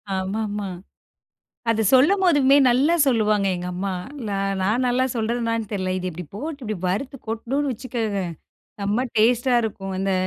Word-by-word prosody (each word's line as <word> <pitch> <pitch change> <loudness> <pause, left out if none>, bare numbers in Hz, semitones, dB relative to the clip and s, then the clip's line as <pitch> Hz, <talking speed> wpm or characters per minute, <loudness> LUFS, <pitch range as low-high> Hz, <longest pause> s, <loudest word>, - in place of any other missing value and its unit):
ஆமாமா. 205 +2 -2 1.0
அத 220 -1 +2
சொல்லும் 320 +10 +5
போதுமே 285 -5 +5
நல்லா 270 +7 +3
சொல்லுவாங்க 215 -5 +2
எங்க 175 0 -5
அம்மா. 195 +2 -2 0.4
நா 200 - -1 0.3
நான் 220 +7 +1
நல்லா 250 +1 +2
சொல்றேனான்னு 230 -1 -1
தெர்ல. 185 -2 -1
"இது 185 0 -3
இப்பிடி 180 +1 -7
போட்டு 290 +6 -5
இப்பிடி 215 -1 -3
வறுத்து 235 +9 -2
கொட்டுணோம்னு 265 +6 -1
வச்சுக்கோங்க, 225 -5 -3 0.6
செம்ம 210 +6 0
டேஸ்ட்‌ 240 +3 +3
டா - - +5
இருக்கும்." 195 -3 -4
அந்த, 195 0 0
225 Hz, 145 wpm, -23 LUFS, 200-255 Hz, 1.0 s, சொல்லும்